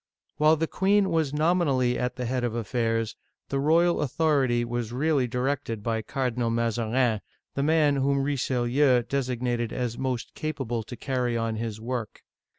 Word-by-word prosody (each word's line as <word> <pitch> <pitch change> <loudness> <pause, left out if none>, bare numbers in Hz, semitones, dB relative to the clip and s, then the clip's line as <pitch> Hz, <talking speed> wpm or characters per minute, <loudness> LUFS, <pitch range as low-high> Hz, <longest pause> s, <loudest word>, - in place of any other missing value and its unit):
While 155 +2 +5
the 160 +1 0
queen 195 +2 +2
was 160 -4 +1
nominally 150 -6 +2
at 125 0 -2
the 125 - -3
head 125 +1 -1
of 120 -2 -1
affairs, 115 -1 -1 0.3
the 135 - 0
royal 165 +4 +3
authority 135 -5 +1
was 120 -1 -3
really 140 0 +1
directed 125 -3 -2
by 115 0 -1
Cardinal 125 0 -1
Mazarin, 115 0 +1 0.3
the 140 - -1
man 150 -1 +3
whom 140 0 +1
Richelieu 130 -1 +2
designated 125 -3 -1
as 120 -2 -3
most 130 -3 -3
capable 135 -7 -3
to 115 +3 -8
carry 125 -3 -1
on 115 -1 -1
his 110 -1 -4
work. 115 -1 -5
125 Hz, 155 wpm, -26 LUFS, 115-145 Hz, 0.3 s, While